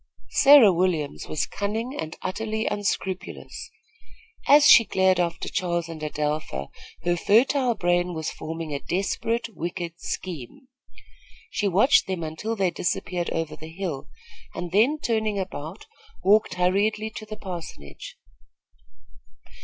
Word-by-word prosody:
Sarah 275 -8 +8
Williams 170 -5 -1
was 155 - -1
cunning 220 +6 -3
and 160 - -5
utterly 220 +3 -2
unscrupulous. 190 -2 -3 0.8
As 290 +1 +7
she 235 - +9
glared 190 -3 +2
after 170 -1 -1
Charles 175 -3 -1
and 165 -2 -8
Adelpha, 150 - -3 0.3
her 175 0 +2
fertile 245 +6 +3
brain 175 -1 +1
was 160 -1 -3
forming 160 -1 -6
a 140 - -2
desperate, 225 +7 -2
wicked 170 0 -5
scheme. 185 - -6 0.8
She 205 - 0
watched 205 - +4
them 185 -3 -3
until 160 +9 -4
they 190 -4 +1
disappeared 175 0 -2
over 160 -2 -3
the 155 +1 -10
hill, 165 -6 -5 0.5
and 175 -1 -5
then, 230 +11 +3
turning 220 -7 -1
about, 185 -1 -6 0.4
walked 210 0 +4
hurriedly 205 +4 +1
to 215 - -8
the 215 0 -7
parsonage. 160 - -8
185 Hz, 125 wpm, -25 LUFS, 165-215 Hz, 0.8 s, she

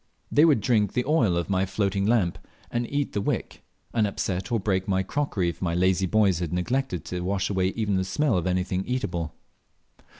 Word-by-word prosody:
They 150 - +6
would 145 -9 +4
drink 105 -3 +2
the 125 - 0
oil 130 - +2
of 85 - -1
my 95 -1 +1
floating 100 0 0
lamp 105 -7 +2 0.3
and 120 0 -2
eat 145 0 -1
the 100 - 0
wick, - - -3 0.3
and 110 -3 +2
upset 95 +1 -3
or 115 - +2
break 95 -2 0
my 95 -1 +1
crockery 100 -7 -1
if 85 - -7
my 85 -2 0
lazy 95 +1 +2
boys 100 -3 +3
had 85 -3 -3
neglected 95 +2 -1
to 90 - -4
wash 95 +2 -1
away 95 -2 +1
even 105 -4 0
the 95 - +1
smell 120 +8 +1
of 90 0 0
anything 90 +1 0
eatable. 85 - -2
95 Hz, 200 wpm, -26 LUFS, 90-115 Hz, 0.3 s, They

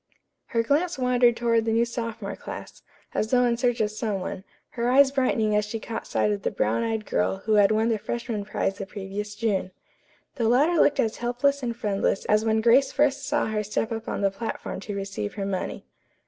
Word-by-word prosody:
Her 230 -2 0
glance 305 +7 +1
wandered 250 -2 +3
toward 230 -1 +2
the 225 - 0
new 230 +1 +3
sophomore 230 -3 -5
class, - - -9 0.3
as 215 - -1
though 250 0 +4
in 240 -1 +2
search 245 0 0
of 210 -1 +1
some 215 -2 -2
one, 185 0 -5 0.3
her 235 0 -1
eyes 270 +1 +6
brightening 230 -6 +1
as 210 - +3
she 210 +2 -4
caught 225 +1 -6
sight 210 - +1
of 205 -1 -2
the - - 0
brown 110 +2 0
eyed 220 -1 -2
girl 95 +2 0
who 220 - +2
had 205 -1 +5
won 220 +2 +2
the 220 -2 0
freshman 235 -1 -3
prize 200 -1 -2
the 195 - -5
previous 205 +1 -6
June. 210 -4 0 0.7
The 230 -3 +2
latter 300 +8 +4
looked 290 - +3
as 220 -1 +1
helpless 255 +4 0
and 235 -2 -2
friendless 200 -3 0
as 215 +1 +3
when 220 0 +2
Grace 245 +4 +5
first 280 -1 +1
saw 295 +1 +1
her 215 -1 -1
step 215 +2 -2
up 225 0 -4
on - - -3
the 195 -1 +2
platform 220 0 -5
to 205 +1 -6
receive 195 - -4
her 200 - -3
money. 190 -2 -3
225 Hz, 215 wpm, -25 LUFS, 210-245 Hz, 0.7 s, eyes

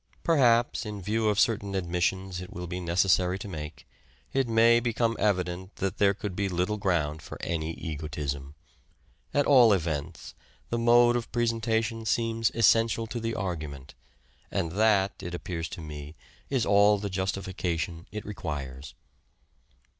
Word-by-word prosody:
Perhaps, 120 -8 +3
in 105 -2 -6
view 110 +3 0
of 105 -1 +1
certain 100 -3 +1
admissions 90 +1 -1
it 90 - -9
will 90 0 -6
be 90 +1 -4
neces 90 +3 +1
sary 90 +1 +2
to 100 - -7
make, 75 -5 -8 0.5
it 135 -2 +1
may 115 +1 +5
become 115 -1 0
evident 90 -2 -1
that 95 +1 -3
there 100 -1 +4
could 100 -3 -5
be 100 0 -1
little 90 +4 -1
ground 80 -6 0
for - - -9
any 80 -1 -2
egotism. 75 -3 -5 0.8
At 145 - +2
all 125 -6 +7
events, 80 -3 -3 0.4
the 120 - 0
mode 120 +1 +5
of 120 -1 -3
presentation 115 -1 0
seems 115 0 +1
essential 115 0 +3
to 120 +2 -5
the 115 0 -3
argument, 75 -7 -5 0.6
and 85 - -2
that, 100 -1 +2
it 90 -1 -5
appears 85 -2 -4
to - - -7
me, 75 -1 -8 0.3
is 130 -5 +1
all 100 +1 +5
the 100 +1 -4
justification 90 -3 -3
it 105 +1 -6
requires. 75 -9 -6
95 Hz, 150 wpm, -28 LUFS, 85-115 Hz, 0.8 s, all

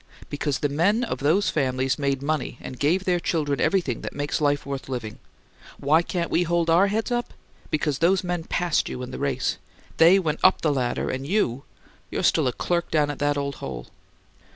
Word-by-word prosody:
Because 145 -1 -1
the 145 - 0
men 180 - +2
of 240 - -3
those 165 +9 +2
families 130 -1 0
made 140 -1 -1
money 150 -4 -2
and 130 - -8
gave 170 +6 +2
their 180 -1 +2
children 145 -6 -1
everything 175 - +1
that - - -6
makes 145 +1 -2
life 145 -1 +1
worth 140 -1 -5
living! 115 -5 -5 0.6
Why 150 +4 +3
can't 170 0 -3
we 170 - +3
hold 170 -1 +1
our 180 +4 +5
heads 220 +4 -1
up? 240 0 -2 0.3
Because 150 -2 -1
those 185 +3 +3
men 175 -2 -3
passed 175 -2 0
you 125 - -5
in 125 - -7
the - - -6
race. 135 -2 -1 0.4
They 170 +4 +7
went 160 -5 -1
up 185 - +5
the 150 -3 +2
ladder, 125 -3 -1
and 135 +2 -4
you 140 - 0 0.4
you're - - -3
still - - +3
a - - +2
clerk 170 +6 -1
down 150 -2 +2
at 145 - -8
that 145 0 +1
old 140 -1 -3
hole!" - - -6
150 Hz, 200 wpm, -24 LUFS, 140-175 Hz, 0.6 s, They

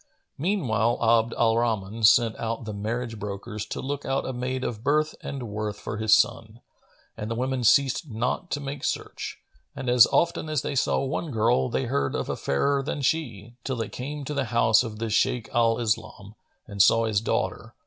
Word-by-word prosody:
Meanwhile 125 - +1
Abd 115 0 +3
al 115 -1 +3
Rahman 110 -2 -2
sent 115 +1 +5
out 115 0 -3
the 110 - -5
marriage 115 +2 -4
brokers 105 +1 -5
to - - -5
look 145 +1 -4
out 135 +1 -1
a 130 - -3
maid 130 +1 -3
of 110 -3 -4
birth 155 +3 +2
and 135 -3 -5
worth 105 0 -4
for 105 - -5
his 110 0 +5
son, 110 +1 -1 0.6
and 105 - -5
the 115 - -2
women 130 +1 -1
ceased 140 +6 +3
not 125 +10 -2
to 145 - -2
make 140 0 -6
search, - - -3 0.4
and 130 - -4
as 125 -2 +7
often 170 -2 +1
as 155 -3 0
they - - -3
saw 135 +1 +1
one 145 +4 -3
girl, 110 - +2
they - - -1
heard 70 0 -1
of - - -3
a - - -1
fairer 140 - 0
than 145 0 -4
she, 120 -7 -2
till 135 - -2
they 115 -3 -3
came 145 +3 -6
to 150 - -4
the 140 -2 -1
house 110 -1 +4
of 115 -3 -5
the 115 0 -3
Shaykh 115 +2 +1
al 115 -2 +3
Islam[FN#445] 105 -3 -3 0.3
and 100 -2 -1
saw 115 +5 +5
his 105 -2 +1
daughter. - - -2
115 Hz, 200 wpm, -26 LUFS, 110-135 Hz, 0.6 s, as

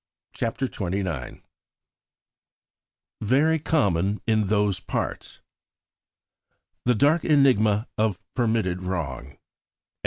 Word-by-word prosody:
CHAPTER 115 +4 -2
XXIX 90 - -4 1.8
"Very 145 +9 +2
Common 100 - +1
in 110 -3 +2
those 105 -2 +1
Parts" - - -5 1.4
"The 125 0 +3
dark 145 +9 +3
enigma 115 -7 +3
of 110 -4 +1
permitted 110 -7 0
wrong." 75 -7 -5
105 Hz, 75 wpm, -25 LUFS, 95-125 Hz, 1.8 s, The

